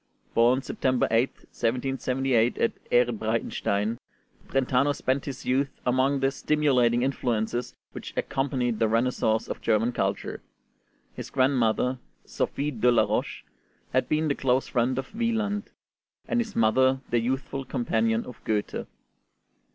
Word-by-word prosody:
Born 125 +3 +4
September 130 -1 0
8th, 115 +4 +1
1778, 125 0 0
at - - +1 0.2
Ehrenbreitstein, 110 -2 0 0.5
Brentano 135 +2 +2
spent 130 -1 -1
his 135 -2 -6
youth 135 +2 +1 0.2
among 130 +2 +2
the 135 0 +2
stimulating 130 -6 +2
influences 120 -2 -1 0.2
which - - -8
accompanied 125 -4 -1
the 115 - +3
renaissance 115 -1 +1
of - - -5
German 115 +2 +2
culture. - - -2 0.7
His - - -7
grandmother, 130 -1 +2 0.3
Sophie 145 +1 -2
de 125 -1 +3
la 115 -2 +4
Roche, - - -2 0.5
had 130 - +1
been 155 +1 +1
the 145 - +2
close 130 -1 +1
friend 125 +1 0
of 135 - -5
Wieland, 220 -2 -1 0.6
and 245 - +1
his 225 -3 -3
mother 130 +4 +3
the 120 - +3
youthful 135 +3 -2
companion 115 -3 0
of 125 - -11
Goethe. 105 -2 -2
125 Hz, 130 wpm, -26 LUFS, 115-135 Hz, 0.7 s, Born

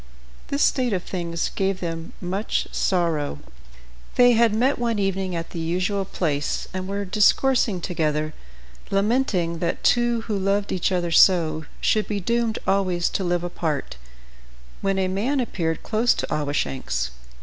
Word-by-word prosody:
This 280 - +1
state 250 -5 +2
of 180 -2 -1
things 170 -2 -3
gave 195 -1 0
them 165 -2 -5
much 190 +4 -2
sorrow. 165 - 0 0.8
They 245 0 +6
had 230 -1 +4
met 255 +5 +2
one 235 -2 0
evening 195 -2 -1
at 165 0 -4
the 170 - -5
usual 185 +4 -1
place, 150 -6 -2
and 185 0 -4
were 200 +1 -3
discoursing 210 +1 +3
together, 155 -3 -1 0.6
lamenting 195 -5 +1
that 170 0 -2
two 240 -1 +3
who 220 -2 -3
loved 200 +1 0
each 185 0 0
other 175 -2 0
so, 160 -3 +4 0.2
should 215 -1 +2
be 205 -1 -2
doomed 235 +3 0
always 185 -3 +1
to 195 - -2
live 175 -1 0
apart, 160 - -3 0.8
when 195 0 0
a 190 -1 +1
man 220 +10 0
appeared 165 -9 -2
close 230 +2 +2
to - - -2
Awashanks. 130 - -2
185 Hz, 150 wpm, -23 LUFS, 170-215 Hz, 0.8 s, They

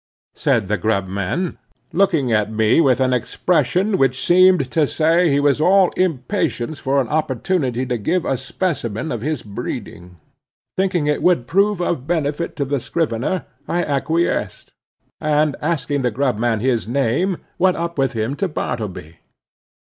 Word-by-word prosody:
said 110 -4 +1
the 105 +2 0
grub 100 -3 +1
man, 100 - -3 0.3
looking 165 -10 +2
at 105 0 +1
me 110 +7 +3
with 130 -5 +3
an 130 -1 +2
expression 180 - +1
which 130 -1 +1
seem 185 +1 +6
to 145 +1 0
say 165 +4 +2
he 140 0 +2
was 145 0 +2
all 190 +2 +4
impatience 140 -4 -1
for 140 +1 +1
an 130 - 0
opportunity 135 -3 -1
to 125 -2 -2
give 175 - 0
a - - +1
specimen 135 - -3
of 120 - -3
his 150 +1 -2
breeding. 90 -3 -7 0.6
Thinking 185 -5 0
it 150 0 0
would 175 -9 +2
prove 200 +6 +2
of 160 -6 -2
benefit 160 -1 -1
to 140 - -1
the 140 +1 -1
scrivener, 155 +4 -2 0.2
I 175 +1 0
acquiesced; 160 +4 -1 0.5
and 150 -1 +1
asking 145 -3 -1
the 125 - +1
grub 125 -1 -1
man 115 -2 0
his 120 -3 0
name, 140 - 0 0.2
went 185 0 +3
up 170 -2 -3
with 135 -2 +1
him 115 +4 -2
to 195 - 0
Bartleby. 155 - -5
140 Hz, 155 wpm, -20 LUFS, 120-170 Hz, 0.6 s, seem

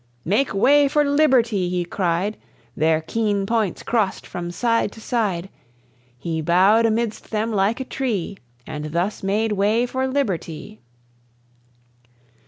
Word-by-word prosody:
"Make 215 - +1
way 280 +8 +4
for 295 +2 +2
liberty!" 255 -10 +2
he 180 -1 -1
cried. 180 +3 -1 0.4
Their 160 +1 +2
keen 205 +3 -1
points 220 -4 -1
crossed 220 -5 -1
from 175 -1 -6
side 230 +3 0
to - - -12
side; 205 -7 -1 0.7
He 160 +4 -3
bowed 190 +8 +4
amidst 225 0 -2
them 220 +1 -1
like 205 +4 +1
a 265 - -4
tree, 215 -9 -3 0.3
And 150 0 -6
thus 180 +5 -1
made 210 +3 0
way 210 +4 +2
for 260 +1 -2
liberty. 215 - -3
210 Hz, 130 wpm, -22 LUFS, 180-235 Hz, 0.7 s, way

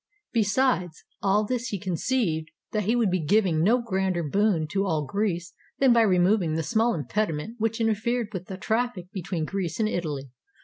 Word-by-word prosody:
Beside 220 -3 +2 0.3
all 205 +2 +2
this 250 +2 -2
he 205 - -2
conceived 180 -3 -1 0.2
that 210 -2 -1
he 225 +4 +2
would 230 -6 +2
be 180 -3 0
giving 180 -2 +3
no 230 +7 +4
grander 190 -5 0
boon 175 0 +1
to 195 0 +1
all 160 -6 0
Greece 180 -2 -2 0.2
than 265 -3 +5
by 235 - +5
removing 185 -4 +3
the 160 - -1
small 225 +4 +2
impediment 165 - -2
which 225 +1 0
interfered 225 +1 0
with 185 -2 -5
the 190 - -6
trafl&c 220 -3 -1
between 180 -4 -3
Greece 180 -1 -3
and 220 - +2
Italy. 150 - -3
195 Hz, 175 wpm, -26 LUFS, 170-225 Hz, 0.3 s, than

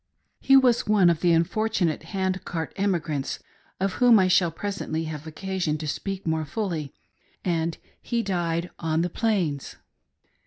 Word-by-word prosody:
He 270 - +6
was 250 -3 +3
one 200 -5 +5
of 165 - -1
the 175 - +4
unfortunate 170 0 +1
Hand 190 -1 -1
Cart 160 -3 -4
Emi 195 -3 +1
grants, 145 -4 -3 0.4
of 195 0 0
whom 245 -2 +7
I 190 -2 +4
shall 180 -1 +4
presently 165 -2 -3
have 155 -1 -6
occasion 175 -1 -2
to 155 0 -5
speak 195 +6 -4
more 160 -1 0
fully; 155 -3 -3 0.5
and 165 -2 0 0.2
he 235 -1 -1
died 175 -3 -1
on 160 0 0
the 175 - -2
plains. 180 - -1
175 Hz, 155 wpm, -25 LUFS, 160-195 Hz, 0.5 s, whom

